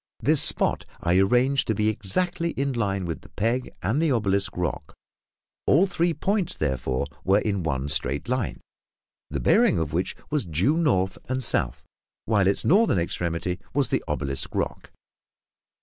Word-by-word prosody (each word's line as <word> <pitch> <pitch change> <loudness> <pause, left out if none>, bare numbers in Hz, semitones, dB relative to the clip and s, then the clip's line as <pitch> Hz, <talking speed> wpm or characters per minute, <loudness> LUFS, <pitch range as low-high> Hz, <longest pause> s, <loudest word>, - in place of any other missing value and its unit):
This - - +4
spot - - +2 0.2
I 85 +2 +2
arranged 125 +7 +3
to 110 - +1
be 105 +1 +1
exactly 170 - -1
in 140 0 -1
line 100 -5 -1
with 85 -2 -4
the - - -16
peg 115 +5 -1
and 115 - +1
the 165 -3 +2
obelisk 100 -6 0
rock; 90 -2 -3 0.7
all 170 +8 +5
three 175 -2 0
points, 190 +4 -1
therefore, 65 -2 -1 0.2
were 95 +2 +4
in 100 -3 -1
one 70 -4 -2
straight 75 - 0
line, 125 -1 -2 0.7
the - - -3
bearing - - +4
of 80 -2 -2
which 90 +3 -1 0.2
was 150 -3 +1
due 90 - +1
north 110 - +1
and 130 0 -1
south, - - -1 0.4
while 105 -4 +2
its 100 - +1
northern 205 - +4
extremity 85 +1 -2 0.2
was 140 -4 +2
the - - 0
obelisk 70 0 -2
rock. - - -3
100 Hz, 160 wpm, -25 LUFS, 85-140 Hz, 0.7 s, all